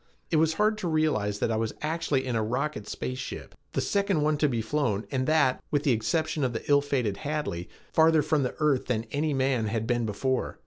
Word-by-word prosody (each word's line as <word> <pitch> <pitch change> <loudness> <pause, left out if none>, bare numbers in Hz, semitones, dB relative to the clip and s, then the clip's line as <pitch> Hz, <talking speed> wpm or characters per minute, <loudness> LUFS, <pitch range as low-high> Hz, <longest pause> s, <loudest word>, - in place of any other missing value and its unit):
It 160 - +3
was 160 +1 +3
hard 215 +2 +2
to 185 - -2
realize 150 -11 +1
that 115 - 0
I 110 - +1
was 110 0 -2
actually 155 -4 0
in 125 -2 -2
a 110 - +1
rocket 125 0 -2
space 130 +4 -4
ship, - - -7 0.2
the - - 0
second 200 -5 +1
one 155 0 +2
to 150 - +3
be 120 -3 -1
flown 110 -3 -1
and 130 -2 0
that, 155 -5 +3
with 145 -1 0
the 145 - +3
exception 155 +6 0
of 125 -2 0
the 115 - -5
ill 145 -1 +5
fated 125 -8 -1
Hadley, 145 - -3 0.2
farther 160 -1 +5
from 155 0 +1
the 125 - -2
earth 150 -4 +1
than 115 -3 -1
any 150 0 0
man 130 -4 +1
had 110 0 -1
been 120 -1 0
before. 130 +5 -1
135 Hz, 225 wpm, -27 LUFS, 115-155 Hz, 0.2 s, ill